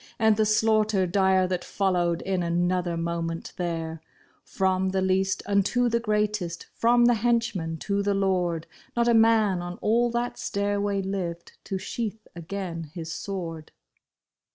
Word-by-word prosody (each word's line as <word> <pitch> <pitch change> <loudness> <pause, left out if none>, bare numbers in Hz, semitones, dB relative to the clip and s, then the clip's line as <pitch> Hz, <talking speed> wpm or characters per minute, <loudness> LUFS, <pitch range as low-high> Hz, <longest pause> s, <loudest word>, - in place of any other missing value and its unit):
And 220 -2 +4
the 215 0 +2
slaughter 215 -2 +3
dire 190 0 +3
that 180 -1 -2
followed 175 -4 0
in 190 -2 -1
another 175 0 0
mo 170 0 -2
ment 165 0 -5
there! 165 -2 -3 0.4
From 190 -1 0
the 190 0 0
least 190 0 +1
unto 205 +5 +2
the 235 0 +1
greatest, 210 -6 -1
from 240 +1 +4
the 240 - +5
henchman 225 -8 0
to 200 0 0
the 200 0 +1
lord. 180 -4 0 0.3
Not 235 0 +2
a 235 - +5
man 220 -5 +4
on 175 0 -6
all 235 +3 +2
that 240 +1 -2
stairway 200 0 -1
lived 180 -3 -4
to 195 - -2
sheath 215 +2 -5
again 170 -1 -5
his 165 -2 -5
sword. 165 -4 -5
190 Hz, 150 wpm, -26 LUFS, 175-215 Hz, 0.4 s, the